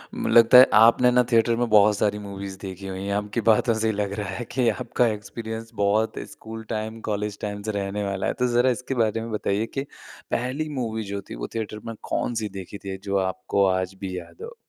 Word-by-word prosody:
म - - -2
लगता 115 +1 +7
है 130 - +11
आपने 115 +3 +6
ना 125 0 +4
थिएटर 115 0 +4
में 120 +1 0
बहुत 105 -1 +5
सारी 105 0 +1
मूवीज़ 100 -1 -7
देखी 95 0 -7
हुई 95 0 -5
हैं, 100 - -2
आपकी 105 +3 -2
बातों 115 +2 +3
से 110 0 0
ही 110 - +1
लग 100 -1 -2
रहा 105 - -3
है 95 +5 -4
कि 125 -2 +1
आपका 120 +1 0
एक्सपीरियंस 110 +1 -5
बहुत 105 +2 +1
स्कूल 110 0 -9
टाइम, 110 0 -4
कॉलेज 105 -1 -3
टाइम 105 -1 -4
से 110 - -2
रहने 100 +1 -3
वाला 100 -1 -2
है। - - 0
तो 125 - +3
ज़रा 125 +2 +4
इसके 130 +2 -2
बारे 110 +1 -1
में 115 0 -6
बताइए 105 0 0
कि 135 - 0 0.5
पहली 130 +6 -1
मूवी 110 -2 -2
जो 100 - -3
थी, - - -9
वो - - -5
थिएटर 110 -1 -4
में 115 - -5
कौन-सी 110 -3 -1
देखी 95 +2 -8
थी 95 -1 -6
जो 100 -1 0
आपको 95 +1 0
आज 95 0 0
भी 95 -2 -4
याद 390 - -14
हो? 475 +1 -8
105 Hz, 225 wpm, -24 LUFS, 100-115 Hz, 0.5 s, है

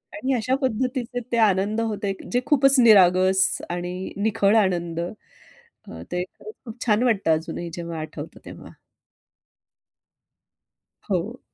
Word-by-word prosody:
आणि 270 -3 -1
अशा 255 +2 0
पद्धतीचे 255 0 -2
ते 235 - +1
आनंद 210 +1 +2
होते 210 -3 -2 0.2
जे 245 - +2
खूपच 275 -2 +4
निरागस 190 -4 +5 0.3
आणि 175 +1 -4 0.2
निखळ 205 0 +2
आनंद. 175 -3 -2 0.7
अ, 470 - -13
ते 180 0 -1 0.2
खूप 435 - -10
खूप 225 -1 -9
छान 220 0 +2
वाटतं 200 -9 +2
अजूनही 165 +2 -4
जेव्हा 170 -1 -6
आठवतं 155 - -8
तेव्हा. - - -11 2.4
हो. 200 +7 -2
210 Hz, 120 wpm, -23 LUFS, 180-245 Hz, 2.4 s, निरागस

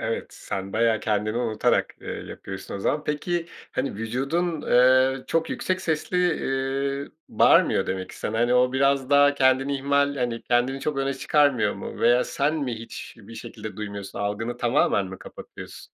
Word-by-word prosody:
Evet, - - -2
sen 95 0 -6
bayağı 110 0 +2
kendini 110 +1 -1
unutarak, 115 -3 +1
ııı, - - -6 0.2
yapıyorsun 95 0 -8
o - - -4
zaman. 150 +8 0
Peki, 165 +3 -2 0.3
hani, 135 - -2
vücudun, 140 - -2
eee, 130 +1 +4
çok 165 0 0
yüksek 185 0 -2
sesli, 160 +1 -2 0.2
iii, 135 +1 -2 0.2
bağırmıyor - - +4
demek 95 0 -3
ki - - -12
sana, 110 +1 -3
hani, 120 +1 +2
o 125 0 +3
biraz 135 0 +1
daha 145 0 +5
kendini 135 +1 +2
ihmal, 140 +1 +1
hani, 120 -3 -2
kendini 125 +3 +1
çok 150 0 -2
öne 135 0 0
çıkarmıyor 145 -3 +2
mu? - - -8
Veya 120 +1 +4
sen 145 +2 0
mi 140 -6 -2
hiçbir 115 -1 -10
şekilde 110 -1 -8
duymuyorsun, 100 -2 -6
algını 105 +4 -3
tamamen 120 -5 +2
mi 95 0 -9
kapatıyorsun? - - -11
130 Hz, 160 wpm, -25 LUFS, 115-140 Hz, 0.3 s, daha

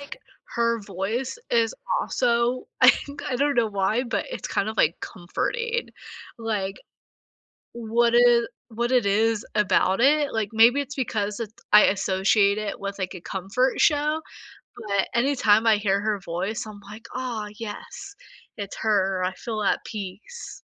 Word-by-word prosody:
like 285 - -9 0.4
her 235 -1 +1
voice 210 - -3
is 230 -1 +2 0.3
also, 240 0 0
I - - +8
think, 285 0 -6
I 250 - -2
don't 285 +2 +1
know 235 -3 +3
why, 205 +4 0
but 245 - -2
it's - - -5
kind 200 - -1
of 220 - -5
like, 165 - +3
comforting, 470 - -3 0.5
like, 210 -4 -2 1.0
what 235 0 +1
it 240 -1 +5 0.2
what 235 +2 -2
it 250 -4 +3
is 215 +2 +1
about 195 -1 +2
it, 290 +2 +3
like, 215 -2 -1
maybe 235 +5 +5
it's 280 0 -7
because 210 -5 -2
it 220 -2 -5 0.2
I 210 - +9
associate 200 +1 +2
it 215 -2 -4
with, 200 0 -5
like, 185 -1 -3
a 180 - -9
comfort 200 +9 -1
show 300 +1 +2 0.7
but 200 -1 +1
anytime 235 -4 +3
I 220 -2 +6
hear 200 -1 +1
her 210 -1 -1
voice 190 +5 -4
I'm 210 -1 -10
like, 210 +3 -12
"Ah 240 -5 -4
yes, 385 - -8 0.4
it's 200 -1 -6
her. 195 -4 +1
I 185 - -1
feel 215 +2 -5
at 200 - +1
peace." 210 - -8
220 Hz, 155 wpm, -24 LUFS, 200-245 Hz, 1.0 s, I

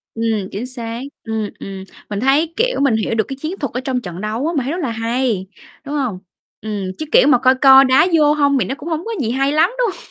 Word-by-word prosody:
Ừm, 220 -4 -1
chính 210 +5 -4
xác. 235 -2 -6 0.2
Ừm, 220 -2 -3
ừm, 195 -1 -7 0.3
mình 205 -1 -3
thấy, 285 +7 +2
kiểu, - - +1
mình 275 -5 +3
hiểu 220 +1 -1
được 220 - +2
cái 270 - -6
chiến 340 +6 -4
thuật 280 -6 -4
ở 250 - -2
trong 255 -1 -2
trận 180 -3 -7
đấu 220 +7 -2
á, 335 - -1
mình 270 - +1
thấy 265 - -3
rất 355 - -3
là 265 -7 -2
hay, 230 -3 -1 0.4
đúng 285 +2 -4
hông? 250 -10 -2 0.4
Ừm, 210 -2 -4
chứ 310 - -4
kiểu - - +6
mà 270 -4 +6
coi 260 +1 +4
coi 270 0 +7
đá 260 +6 +4
vô 300 -1 +4
hông 285 -2 +2
thì - - +1
nó 265 - -3
cũng 310 - -7
hổng 320 +1 -3
có 460 - -4
gì 230 -3 -1
hay 275 +2 +1
lắm, 315 +5 +3
đúng 485 -3 +2
hông? - - -15
260 Hz, 265 wpm, -18 LUFS, 225-290 Hz, 0.4 s, coi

